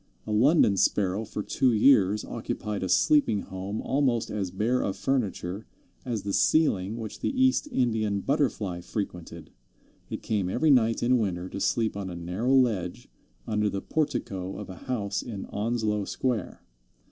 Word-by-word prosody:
A 110 - -5
London 115 - +4
Sparrow 100 +2 +1
for 105 - -5
two 130 +4 +2
years 105 -3 +4
occupied 105 -1 -4
a 95 - -2
sleeping 110 - +3
home 95 +3 -5
almost 130 -4 +1
as 100 -3 -2
bare 110 +7 0
of 95 - -2
furniture 100 -4 -2 0.4
as 115 -5 -3
the 100 0 -3
ceiling 110 - +2
which 110 -3 -6
the - - -1
East 260 +3 +3
Indian 110 - 0
Butterfly 110 - -1
frequented. 85 -4 -6 0.6
It - - -6
came 100 -4 -1
every 145 +10 +2
night 115 -4 +3
in 125 +1 +3
winter 90 -4 -2
to 100 - -6
sleep 110 +1 0
on 100 -2 -4
a 90 - -6
narrow 90 +10 0
ledge 105 -9 +1 0.4
under 105 -1 0
the 100 - -3
portico 95 -11 -2
of 105 -2 -7
a - - -8
house 105 -6 -1
in 105 -5 -6
Onslow 105 -1 -1
Square. 120 -4 -3
105 Hz, 160 wpm, -27 LUFS, 95-120 Hz, 0.6 s, London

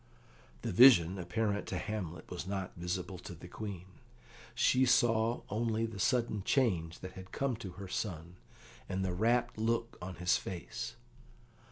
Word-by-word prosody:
The - - -1
vision, 95 -5 +7
apparent 105 +4 -1
to - - -2
Hamlet, 95 -6 -5
was 90 0 -5
not 95 -2 -3
visible 90 +1 -3
to 90 - -8
the 85 - -11
Queen. 95 -1 -6 0.7
She 125 - +3
only 130 - +6
saw 115 -1 +3
the 115 0 -1
sudden 115 -1 +1
change 90 -12 +1
that 95 - -6
had 95 0 -11
come 135 -3 0
to 95 -6 -7
her 95 +2 -8
son, 90 -3 -4 0.5
and 95 +1 -1
the 90 - -1
rapt 120 +4 +1
look 115 +1 -1
on 90 0 -6
his 90 +2 +2
face. 85 -10 -6
95 Hz, 155 wpm, -33 LUFS, 90-115 Hz, 0.7 s, vision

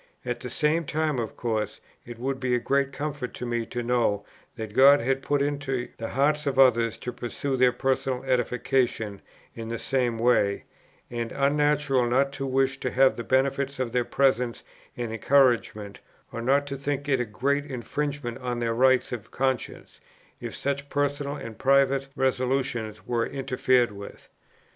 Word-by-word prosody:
At - - -2
the - - -6
same 155 +2 +1
time 155 -2 -1
of 115 -2 -4
course 110 -3 -2 0.3
it 120 -1 -8
would 130 +2 -3
be 130 -1 +1
a - - +1
great 140 +2 +1
comfort 140 -2 -4
to - - -5
me 120 -1 -2
to 120 - -4
know 115 -4 +1 0.3
that 110 -3 -6
God 140 +4 +7
had 135 +2 0
put 145 0 +1
it - - +2
into 140 -3 -2
the 115 - -5
hearts 150 +3 +1
of 135 -2 -1
others 120 -4 +4
to 125 - -5
pursue 130 +3 -3
their 125 -1 +4
personal 135 0 -1
edification 125 -4 0 0.3
in 115 -1 -7
the 115 - -3
same 125 -2 0
way, 110 -4 +2 0.5
and 120 -1 -3
unnatural 145 -2 +2
not 135 +3 +2
to 135 -1 -4
wish 135 +1 +1
to 130 - -2
have 130 +1 +4
the 120 - -5
benefit 135 +2 +1
of 130 -3 -2
their 125 0 +1
presence 125 -2 +1 0.3
and 120 -2 -3
encouragement, 115 -4 +2 0.3
or 115 - -5
not 140 +4 +2
to 140 -1 -5
think 140 +1 -3
it 135 -3 +2
a - - +1
great 140 +6 -1
infringement 135 0 -4
on 125 -2 -3
the 115 -1 0
rights 130 +2 +3
of 120 -4 -6
conscience 130 -1 -3 0.4
if - - -6
such 140 0 -3
personal 145 0 -1
and 115 -6 -8
private 135 0 +3
resolutions 130 -4 -1
were 120 -1 0
interfered 130 -3 +1
with. 100 0 -11
130 Hz, 170 wpm, -26 LUFS, 120-140 Hz, 0.5 s, God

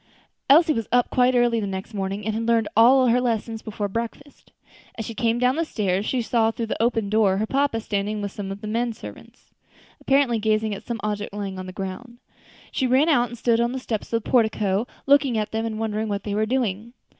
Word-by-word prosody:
Elsie 315 +3 +6
was 230 -5 -3
up 245 0 +2
quite 250 0 +3
early 240 -1 +3
the 205 - -2
next 190 +3 -6
morning 195 0 -3
and 220 - -1
had 225 +1 -2
learned 230 -2 +2
all 255 +4 +6
her 245 +1 +3
lessons 225 -2 -2
before 210 -1 -4
breakfast. 235 +7 -6 0.5
As 225 - -4
she 230 - -6
came 230 0 0
down 250 +3 +2
the 330 - +1
stairs 200 - -1
she 250 -2 0
saw, 225 -1 +2
through 230 +1 -3
the 225 - -3
open 225 -3 +1
door, 205 -2 +2
her 215 - 0
papa 275 -1 0
standing 210 -1 -2
with 200 -1 -4
some 195 -1 -6
of 195 +1 -7
the 215 - -6
men 230 +2 -1
servants, - - -13 0.5
apparently 270 -4 +2
gazing 215 0 +1
at 195 - -9
some 235 -1 -3
object 210 -1 -3
lying 195 -2 -4
on 185 - -7
the - - -6
ground. 195 +6 -7 0.5
She 260 - 0
ran 265 +6 +3
out 245 -6 +3
and 240 - -9
stood 230 0 +2
on 235 +1 0
the 265 - -3
steps 225 -4 -4
of 230 -1 0
the - - -11
portico, 220 -3 +2 0.2
looking 275 -4 +4
at 215 -1 -2
them 225 +1 -2
and 220 -1 -4
wondering 220 0 -2
what 200 -1 -3
they 205 - -3
were 215 +1 0
doing. 235 -2 -2
225 Hz, 230 wpm, -23 LUFS, 210-245 Hz, 0.5 s, Elsie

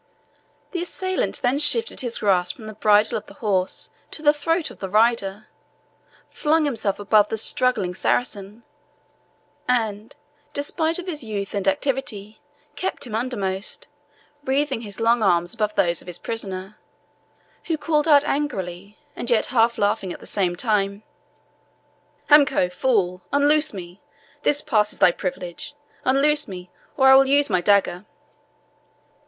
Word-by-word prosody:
The 350 - -3
assailant 370 -4 -2
then 255 +3 +2
shifted 460 +10 +2
his 240 -2 -2
grasp 180 -3 +1
from 225 - -12
the 215 - -7
bridle 215 0 +3
of 215 - -21
the - - -14
horse 195 -8 -1 0.2
to 310 - -9
the 295 0 +5
throat 325 +3 -1
of - - -15
the 190 - -5
rider, 215 -1 +1 0.9
flung 310 0 +1
himself 225 -8 -1
above 210 0 +3
the 225 - -2
struggling 220 -4 +1
Saracen, 205 +1 -2 1.0
and, 220 -3 -1 0.4
despite 320 +3 0
of 360 - -6
his 310 -7 -5
youth 205 -3 -5
and 200 -2 -2
activity 260 -8 -2 0.3
kept 375 - -3
him 235 - -9
undermost, 205 -5 -3 0.6
wreathing 270 -2 0
his 205 -2 -9
long 230 +1 +2
arms 175 -3 +2
above 210 -1 -2
those 170 -2 +1
of - - -19
his 180 -1 -2
prisoner, 195 -2 -5 0.9
who 325 -2 -1
called 305 0 0
out 290 -2 +6
angrily, 200 -9 -3 0.2
and 240 - -4
yet 235 -3 +3
half 235 -1 +3
laughing 205 -2 0
at - - -8
the - - -13
same 185 -4 0
time 200 0 -1 1.3
"Hamako 285 -10 +5
fool 180 -3 0
unloose 295 +2 +3
me 180 -1 -10 0.4
this 290 0 +2
passes 210 -6 +1
thy 175 - +5
privilege 180 +9 -6 0.3
unloose 295 +3 +2
me, 180 -3 -9 0.3
or 265 -1 +5
I - - +9
will 270 0 +6
use 285 -3 +3
my 180 -1 +2
dagger." 200 -1 +2
220 Hz, 145 wpm, -22 LUFS, 195-285 Hz, 1.3 s, I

